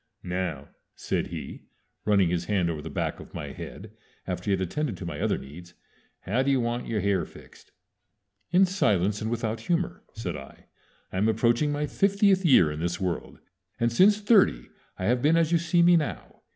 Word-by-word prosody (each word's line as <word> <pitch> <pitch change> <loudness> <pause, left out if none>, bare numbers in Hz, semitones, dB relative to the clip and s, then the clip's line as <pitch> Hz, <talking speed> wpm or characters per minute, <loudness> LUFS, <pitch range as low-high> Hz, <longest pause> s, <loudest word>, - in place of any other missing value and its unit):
"Now," 90 -6 -3 0.3
said - - -2
he, - - -8 0.4
running 100 -4 +3
his 85 -1 -1
hand 90 -4 +1
over 75 -2 -5
the - - -7
back - - -3
of - - -12
my - - -5
head - - -9 0.3
after - - -4
he - - -2
had 95 -1 +1
attended 110 - -2
to 90 - -7
my 80 -4 -5
other - - +1
needs, 85 +6 -12 0.5
"how 115 +7 0
do 135 - 0
you 135 -1 +3
want 120 0 -2
your 110 -3 -1
hair 100 -2 +1
fixed?" - - -15 0.8
"In 185 +3 +5
silence, 105 - +1
and 110 - -2
without 115 -1 -2
humor," 170 +8 -2
said 95 -6 -4
I. 70 -2 -11 0.5
"I - - -3
am 105 +3 +3
approaching 120 +6 +2
my 145 +1 -1
fiftieth 195 +3 +2
year 125 - +5
in 75 - -5
this 85 +1 -2
world, 90 -2 -4 0.4
and 115 0 +2
since 205 - +5
thirty 200 - +3 0.3
I 95 - -3
have 120 +3 +2
been 155 +4 +4
as 165 -1 +2
you 170 - +4
see 170 +1 +2
me 175 0 +6
now. 150 -3 -4
110 Hz, 195 wpm, -26 LUFS, -, 0.8 s, me